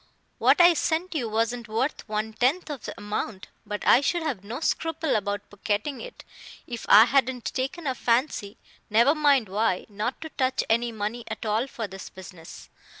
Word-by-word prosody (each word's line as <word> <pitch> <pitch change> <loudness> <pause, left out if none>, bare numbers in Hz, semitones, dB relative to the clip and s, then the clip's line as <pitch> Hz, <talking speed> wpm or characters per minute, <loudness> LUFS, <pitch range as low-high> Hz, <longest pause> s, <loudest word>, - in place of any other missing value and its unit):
"What - - +4
I 350 0 +8
sent 330 +3 -1
you 250 -8 -2
wasn't 230 +2 -1
worth 230 +3 -2
one 215 +1 -2
tenth 280 +9 +1
of 270 -7 -7
the - - -7
amount; 205 -1 -4 0.2
but 210 0 -4
I 255 - +6
should 345 +4 0
have 260 -12 -3
no 230 +6 -6
scruple 325 -1 -1
about 205 -1 -2
pocketing 210 +7 -2
it, - - -10 0.4
if 235 -2 -7
I 210 +2 +10
hadn't 255 -1 +1
taken 270 +6 -3
a 265 - 0
fancy 235 -4 0 0.3
never 235 +7 +5
mind 285 -7 +3
why 195 -1 0
not 210 +5 -3
to 320 - -6
touch 260 -3 0
any 235 +1 +2
money 220 +2 -4
at 220 +1 -6
all 220 +4 0
for 230 -4 -5
this 195 -1 -9
business. 165 - -12
235 Hz, 180 wpm, -26 LUFS, 210-280 Hz, 0.4 s, I